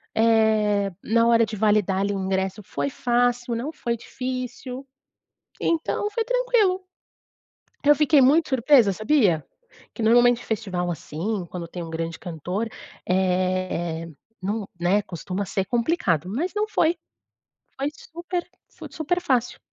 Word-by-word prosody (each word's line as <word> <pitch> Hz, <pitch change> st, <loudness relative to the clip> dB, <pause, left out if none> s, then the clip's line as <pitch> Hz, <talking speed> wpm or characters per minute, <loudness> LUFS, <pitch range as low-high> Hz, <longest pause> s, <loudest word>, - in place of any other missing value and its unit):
Eh, 220 Hz, -3 st, +3 dB
na 230 Hz, +1 st, +3 dB
hora 230 Hz, -1 st, +5 dB
de 215 Hz, 0 st, -6 dB
validar 205 Hz, -2 st, +2 dB
ali 200 Hz, +1 st, 0 dB
o 195 Hz, -, -2 dB
ingresso 190 Hz, +1 st, -1 dB
foi 140 Hz, -6 st, -3 dB
fácil, 245 Hz, -, 0 dB
não 265 Hz, +7 st, -4 dB
foi 235 Hz, -5 st, -2 dB
difícil. 255 Hz, +2 st, -6 dB, 0.7 s
Então, 335 Hz, +5 st, 0 dB
foi 455 Hz, +1 st, -1 dB
tranquilo. 485 Hz, -7 st, +2 dB, 1.0 s
Eu 295 Hz, +1 st, +7 dB
fiquei 300 Hz, 0 st, +4 dB
muito 305 Hz, +5 st, +4 dB
surpresa, 255 Hz, -4 st, +5 dB
sabia? 215 Hz, -, +2 dB, 0.5 s
Que -, -, -5 dB
normalmente 240 Hz, +2 st, +4 dB
festival 190 Hz, -5 st, -2 dB
assim, 175 Hz, +5 st, -3 dB
quando 170 Hz, -2 st, -6 dB
tem 175 Hz, +1 st, -6 dB
um 165 Hz, -, -7 dB
grande 165 Hz, 0 st, -4 dB
cantor, 180 Hz, +6 st, -4 dB, 0.4 s
eh, 185 Hz, -2 st, 0 dB, 0.4 s
não 205 Hz, +2 st, -2 dB
né, 190 Hz, +4 st, +3 dB
costuma 185 Hz, +2 st, -4 dB
ser 190 Hz, +1 st, -2 dB
complicado. 230 Hz, -, 0 dB
Mas 315 Hz, -, -2 dB
não 420 Hz, +1 st, 0 dB
foi. 340 Hz, -5 st, +2 dB, 0.8 s
Foi 275 Hz, +2 st, 0 dB
super 345 Hz, +2 st, -5 dB, 0.3 s
foi -, -, -11 dB
super 355 Hz, +3 st, -1 dB
fácil. 250 Hz, -7 st, 0 dB
220 Hz, 135 wpm, -24 LUFS, 185-265 Hz, 1.0 s, Eu